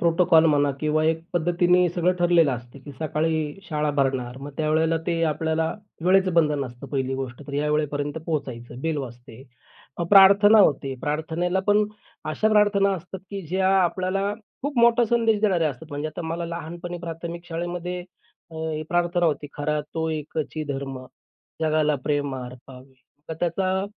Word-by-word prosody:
Protocol 170 -1 +4
म्हणा 145 -2 +3
किंवा 155 0 +1
एक 160 0 +1
पद्धतीने 175 +1 +3
सगळं 175 +1 +1
ठरलेलं 170 -4 +4
असतं, 120 +2 -8
की 145 - -9
सकाळी 155 0 -1
शाळा 150 -2 0
भरणार. 130 -3 0
मग 140 +2 -7
त्यावेळेला 160 +1 +2
ते 170 -1 0
आपल्याला 160 +1 -1 0.3
वेळेचं 185 0 +4
बंधन 150 -4 +2
असतं. 125 +1 -9
पहिली 135 -1 -2
गोष्ट 130 0 -5
तर 145 - -8
या 150 +1 0
वेळेपर्यंत 145 0 -1
पोहोचायचं. 125 -6 -4
बेल 160 +1 -1
वाजते. 120 -3 -8 0.7
प्रार्थना 200 +2 +8
होते. 140 -8 +3
मग 130 - -16
प्रार्थनेला 160 +5 -1
पण 210 0 +4 0.5
अशा 215 +8 +1
प्रार्थना 205 -2 +4
असतात, 185 +2 -8
की 200 -1 -4
ज्या 190 +3 +1
आपल्याला 185 +3 0 0.3
खूप 285 -2 -2
मोठा 235 +1 +5
संदेश 225 -2 +2
देणाऱ्या 180 -7 +2
असतात. 140 +4 -11
म्हणजे 145 +2 -3
आता 155 +3 -7
मला 165 +1 -3
लहानपणी 170 +1 -6
प्राथमिक 170 0 -6
शाळेमध्ये 175 +1 -4 0.5
अ, - - -13 0.3
प्रार्थना 175 0 +1
होती, 150 -2 -1
"खरा 150 +1 -1
तो 160 0 -1
एकची 155 0 -4
धर्म, 135 -2 -4 0.6
जगाला 155 -1 +2
प्रेम 145 -2 -1
अर्पावे." 130 +1 -11 0.3
तर 160 - -3
त्याचा 185 +2 0
160 Hz, 155 wpm, -24 LUFS, 145-180 Hz, 0.7 s, प्रार्थना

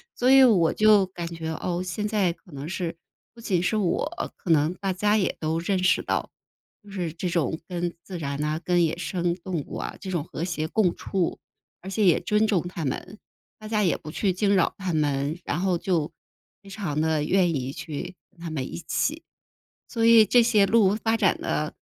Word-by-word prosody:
所 250 +2 +3
以 270 0 +8
我 190 -10 +5
就 210 -3 +5
感 175 -2 -6
觉， 165 -1 -5
哦， 175 +2 -2
现 185 +4 -3
在 205 -5 +1
可 180 - -15
能 140 +3 -6
是 175 -2 -3 0.4
不 230 - -14
仅 185 -6 0
是 185 +5 0
我， 215 - -1
可 175 - -3
能 155 +1 +3
大 195 0 -2
家 210 +3 +2
也 190 - 0
都 160 +1 -1
认 185 +2 -1
识 185 - +3
到， - - -2 0.5
就 205 - -14
是 180 -4 -3
这 170 +3 -4
种 165 -2 -1
跟 175 -1 -3
自 185 -2 -7
然 140 -2 -3
呐， 155 +2 -1
跟 175 -1 +3
野 160 - -1
生 175 -1 -1
动 180 -3 -4
物 - - -7
啊， - - -5
这 190 - -6
种 170 -5 -1
和 160 - -6
谐 160 -3 -2
共 185 -4 +2
处， 185 -4 -2 0.4
而 190 - -8
且 205 +2 +1
也 175 - +4
尊 210 +1 +2
重 185 -6 +1
它 170 -4 -5
们， 190 +10 -4 0.4
大 215 - -10
家 215 -1 +1
也 180 - +2
不 155 - -9
去 190 +3 0
惊 200 +2 +1
扰 185 - +2
它 185 -3 -3
们， 145 0 0
然 150 - -2
后 185 -2 +1
就 170 -4 -1 0.5
非 200 - -15
常 185 -7 -3
地 160 -1 +1
愿 180 0 +2
意 135 0 -3
去 160 +5 -6 0.2
跟 185 - -27
它 170 0 -6
们 135 -5 -4
一 - - -5
起， 310 +3 -1 0.6
所 230 -2 -1
以 230 -1 +8
这 240 +2 +5
些 220 -4 +4
鹿 210 -3 +4
发 225 +1 0
展 - - +2
的 - - -2
180 Hz, 230 characters per minute, -25 LUFS, 165-205 Hz, 0.6 s, 以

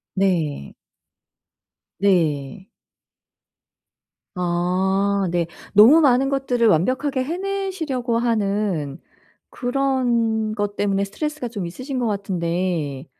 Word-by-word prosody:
네. 165 - 0 1.3
네. 175 -2 0 1.7
아 185 +3 0
네. 170 -1 0 0.3
너무 240 +11 +8
많은 270 -1 +3
것들을 255 -4 0
완벽하게 255 - +1
해내시려고 340 -8 -2
하는 200 - -1 0.5
그런 245 -4 0
것 205 -1 -3
때문에 200 -1 0
스트레스가 300 +5 -4
좀 205 -6 -5
있으신 255 - -5
것 240 - 0
같은데 175 -7 -2
205 Hz, 185 characters per minute, -22 LUFS, 180-255 Hz, 1.7 s, 너무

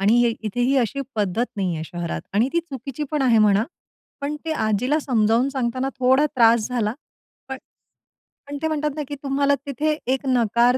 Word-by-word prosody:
आणि 205 +4 +4
हे 235 - +3
इथेही 245 +5 0
अशी 255 +3 -1
पद्धत 210 +2 0
नाही 185 -4 -1
आहे 160 0 -4
शहरात 175 0 -4
आणि 225 +5 +3
ती 340 - +2
चुकीची 275 -3 -7
पण 300 -2 0
आहे 240 -4 +4
म्हणा. 210 0 +4 0.6
पण 290 +2 -2
ते 320 - -1
आजीला 225 +4 +1
समजावून 235 -1 +2
सांगताना 260 -1 -1
थोडा 260 +3 +4
त्रास 230 -1 +5
झाला, 230 -3 -1 0.5
पण 265 0 -5 0.9
पण 285 0 -5
ते 320 - +1
म्हणतात 300 -1 -1
ना, 300 - -3
की 290 - -5
तुम्हाला 280 +1 +2
तिथे 300 +3 -1 0.2
एक 265 +1 -3
नकार 240 0 +3
250 Hz, 180 wpm, -22 LUFS, 220-280 Hz, 0.9 s, त्रास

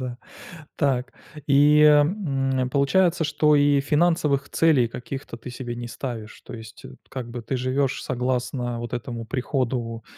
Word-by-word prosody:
Да, 125 -1 -5 0.6
так. 130 -3 0 0.3
И, 145 +1 +5
м, 145 -5 +3
получается, 170 +4 +2
что 150 0 +2
и 145 -1 +4
финансовых 150 -2 +1
целей 145 -8 +3
каких-то 125 +1 -7
ты 120 +2 -9
себе 120 -1 -6
не 120 0 -6
ставишь. 115 -3 -7
То - - -9
есть 110 -1 -11 0.2
как 125 -3 -6
бы 120 -1 -6
ты 130 - -3
живёшь 130 +2 -1
согласно 125 -1 -2
вот 120 0 -6
этому 120 -1 -5
приходу 120 -3 -2
130 Hz, 140 wpm, -24 LUFS, 120-145 Hz, 0.6 s, И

